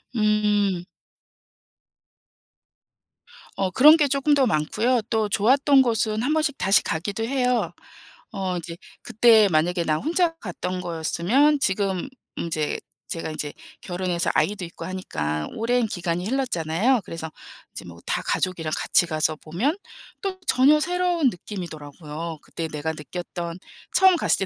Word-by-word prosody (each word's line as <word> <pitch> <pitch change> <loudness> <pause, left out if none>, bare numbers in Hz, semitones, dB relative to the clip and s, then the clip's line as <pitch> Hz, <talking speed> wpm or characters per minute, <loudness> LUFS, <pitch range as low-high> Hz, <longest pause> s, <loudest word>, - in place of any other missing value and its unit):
음. 210 -4 +1 2.7
어 190 -1 -1
그런 300 - +7
게 295 -2 +3
쪼끔 275 +2 +2
더 280 -2 +4
많고요 220 +7 +1
또 220 -2 0
좋았던 270 +7 +4
곳은 225 -3 0
한번씩 305 +1 0
다시 195 +1 +4
가기도 200 +7 -3
해요. 250 0 0 0.6
어 190 -3 -3
이제 170 0 -7 0.2
그때 225 -2 +5
만약에 170 +3 +1
나 155 -2 +1
혼자 335 - 0
갔던 180 - -5
거였으면 180 - +1
지금 195 -4 0 0.3
이제 155 -3 -2 0.3
제가 165 -1 -4
이제 150 -1 -5 0.3
결혼해서 180 -1 -1
아이도 200 -3 0
있고 170 - -9
하니까 75 - -3
오랜 235 +1 +1
기간이 175 -2 -3
흘렀잖아요. 235 -2 +1
그래서 160 -1 -6 0.4
이제 - - -8
뭐 85 -1 -11
다 - - -1
가족이랑 170 -4 -1
같이 175 - +3
가서 155 -1 0
보면 205 - -2 0.4
또 385 -2 -4
전혀 280 +4 +5
새로운 355 -3 +1
느낌이더라고요. 165 -3 -7
그때 165 - -5
내가 155 0 -3
느꼈던, 170 +3 -6 0.4
처음 380 -1 +6
갔을 200 - +1
195 Hz, 280 characters per minute, -24 LUFS, 170-255 Hz, 2.7 s, 그런